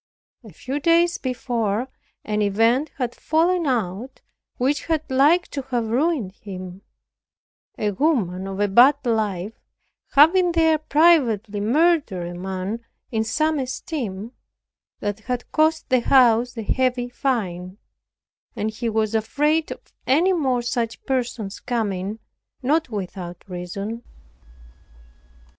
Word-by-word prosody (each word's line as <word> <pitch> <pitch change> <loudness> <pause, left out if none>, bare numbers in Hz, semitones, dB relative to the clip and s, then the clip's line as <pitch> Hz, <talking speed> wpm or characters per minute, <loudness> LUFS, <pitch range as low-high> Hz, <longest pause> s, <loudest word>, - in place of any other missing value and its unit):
A - - -12
few 275 +3 -4
days 340 +3 +3
before, 240 -3 -2 0.4
an 210 0 -1
event 225 +8 +2
had 245 -3 -2
fallen 335 +1 +1
out, 230 0 -2 0.4
which 270 +3 0
had 320 -2 0
like 295 +7 +4
to 280 - -4
have 235 -3 -1
ruined 265 - +1
him; 185 -2 -9 1.0
a 210 -1 0
woman 195 - 0
of 195 0 -5
a 205 - +2
bad 245 +8 +6
life 215 -4 -1 0.6
having 345 +5 +5
there 320 -2 +3
privately 275 - +3
murdered 245 - +2
a - - -7
man 190 +5 -4 0.3
in 220 -2 0
some 310 +7 0
esteem, 245 - -4 0.7
that 205 0 -2
had 245 +3 -5
cost 315 +1 +2
the 255 -1 +4
house 245 -1 +4
a 225 - -3
heavy 250 +2 0
fine; 195 -8 -3 0.8
and 215 +1 -2
he 230 +2 -3
was 220 0 0
afraid 295 +8 +1
of - - -10
any 335 +9 +4
more 260 -8 0
such 235 -1 -3
persons 240 -6 -2
coming, 210 -4 -2 0.5
not 305 +3 +1
without 185 -4 -6
reason. 195 +5 -5
240 Hz, 120 wpm, -22 LUFS, 205-290 Hz, 1.0 s, bad